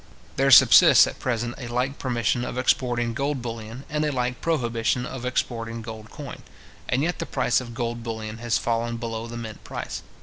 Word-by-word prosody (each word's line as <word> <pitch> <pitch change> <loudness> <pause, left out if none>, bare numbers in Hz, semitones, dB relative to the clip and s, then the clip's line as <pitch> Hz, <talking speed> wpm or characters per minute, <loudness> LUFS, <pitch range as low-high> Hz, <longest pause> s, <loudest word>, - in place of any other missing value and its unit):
There - - +2
subsists - - +8
at - - -7
present 120 -1 -2
a 125 - -6
like 125 +3 -2
permission 120 -1 0
of 125 - -5
exporting 120 -2 +1
gold 140 0 -2
bullion, 115 +2 -6
and 150 +1 -1
a 150 - +1
like 125 -2 -2
prohibition 125 -5 0
of 125 -1 -6
exporting 115 -2 -2
gold 110 -1 -8
coin; 140 -3 -9 0.5
and 130 +3 +1
yet 175 +2 -1
the - - -3
price - - +1
of 120 -2 -9
gold 120 -1 -3
bullion 110 -1 -5
has 120 -1 +1
fallen 115 0 -1
below 115 0 -4
the 120 0 -7
mint 110 -2 -8
price. - - -5
120 Hz, 190 wpm, -25 LUFS, 115-125 Hz, 0.5 s, subsists